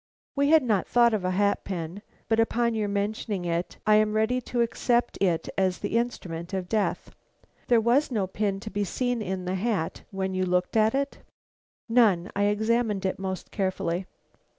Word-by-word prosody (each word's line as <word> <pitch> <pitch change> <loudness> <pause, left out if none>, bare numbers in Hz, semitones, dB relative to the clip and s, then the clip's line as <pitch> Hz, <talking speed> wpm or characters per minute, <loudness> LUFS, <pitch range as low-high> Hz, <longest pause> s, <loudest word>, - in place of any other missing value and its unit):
We 280 0 +2
had 315 -2 +6
not 215 -6 +1
thought 235 -1 +4
of 210 -4 0
a 185 - 0
hat 200 +2 +1
pin, 175 +1 -5 0.3
but 225 0 +2
upon 235 +1 +2
your 215 -2 -1
mentioning 200 -1 -2
it, 170 +1 -2
I 215 0 +6
am 215 0 +2
ready 220 +4 +1
to 240 0 -2
accept 235 +1 +1
it 175 -4 +1
as 185 -1 +1
the - - -3
instrument 185 -7 -2
of 185 -2 -3
death. 210 0 -1 0.6
There 240 -2 +5
was 240 +6 +2
no 215 -7 0
pin 195 +1 -2
to 215 0 -7
be 205 +1 -1
seen 245 +4 -1
in 190 -2 -3
the 180 - -2
hat 190 -4 -1
when 190 -1 -3
you 185 0 0
looked 180 +1 0
at 220 +2 +3
it?" 280 +1 -2 0.7
"None. 215 -7 +3
I 200 +1 +2
examined 215 -1 +1
it 190 - -1
most 190 -1 -5
carefully." 185 -2 -2
205 Hz, 185 wpm, -26 LUFS, 185-230 Hz, 0.7 s, had